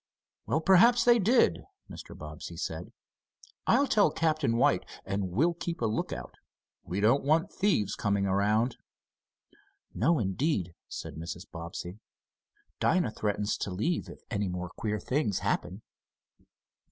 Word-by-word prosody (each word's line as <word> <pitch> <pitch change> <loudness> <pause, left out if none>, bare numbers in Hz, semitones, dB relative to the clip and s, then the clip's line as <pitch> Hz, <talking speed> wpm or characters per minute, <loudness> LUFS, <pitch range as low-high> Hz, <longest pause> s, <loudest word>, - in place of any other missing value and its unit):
"Well, 155 - +1
perhaps 230 +7 +6
they 240 -1 +6
did," 230 +5 +3 0.3
Mr. - - -10
Bobbsey, - - -8
said. - - -5 0.8
"I'll 280 - +5
tell 210 - +4
Captain 155 -6 +1
White, 95 -6 +3 0.2
and 95 -1 -2
we'll 150 - +2
keep 170 0 -5
a 115 - 0
lookout. 110 0 -3 0.5
We 90 +4 -3
don't 115 +7 +3
want 155 +4 +2
thieves 180 - +1
coming 100 -1 0
around." 105 +5 +1 1.2
"No, 160 +8 +2
indeed," 95 - -1
said 80 -2 -7
Mrs. 85 +2 -6
Bobbsey. 85 +3 -7 0.8
"Dinah 180 -11 +2
threatens 105 -1 -1
to - - -3
leave, 110 - -1
if - - -11
any 105 -3 0
more 90 0 -4
queer 105 -1 -2
things 125 -7 0
happen." 95 +5 -2
110 Hz, 130 wpm, -29 LUFS, -, 1.2 s, perhaps